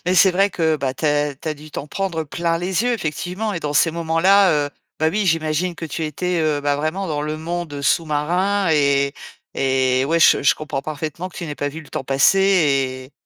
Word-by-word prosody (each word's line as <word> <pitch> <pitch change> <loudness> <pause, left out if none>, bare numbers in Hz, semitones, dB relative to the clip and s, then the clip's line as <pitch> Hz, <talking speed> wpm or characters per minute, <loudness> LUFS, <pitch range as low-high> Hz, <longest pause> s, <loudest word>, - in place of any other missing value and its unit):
mais 180 - +2
c'est 190 +1 +6
vrai 195 +3 +2
que, 160 -3 +1
bah, 135 -2 -2
tu 155 - -7
as 145 -1 +1
tu 155 +3 -7
as 155 - -1
dû 150 +1 -13
t'en 145 - -6
prendre 175 -2 -2
plein 165 +2 -2
les 180 +4 -1
yeux 245 - +2
effectivement 180 +3 -3
et 170 - -4
dans 145 -1 -3
ces 165 +3 +3
moments-là, 170 +4 +3
heu, - - -9 0.3
bah, 160 - +3
oui, 200 +4 -1
j'imagine 165 +1 0
que 165 - -7
tu 160 0 -4
étais, 180 +4 -2
heu, 150 -2 +1
bah, 145 0 0
vraiment 160 +6 -2
dans 150 -2 -2
le 155 +1 -3
monde 160 -2 -5
sous-marin 170 +7 +1
et 140 -2 +2 0.4
et 130 -1 +1
ouais, 165 +4 +1
je - - +5
je - - +4
comprends 150 -3 -5
parfaitement 155 +4 -5
que - - -16
tu 170 - -5
n'ai 150 - -5
pas 145 - -2
vu 160 +3 -8
le 155 - -15
temps - - -5
passer 140 +9 +3
et 140 -8 +1
160 Hz, 225 wpm, -20 LUFS, 145-180 Hz, 0.4 s, c'est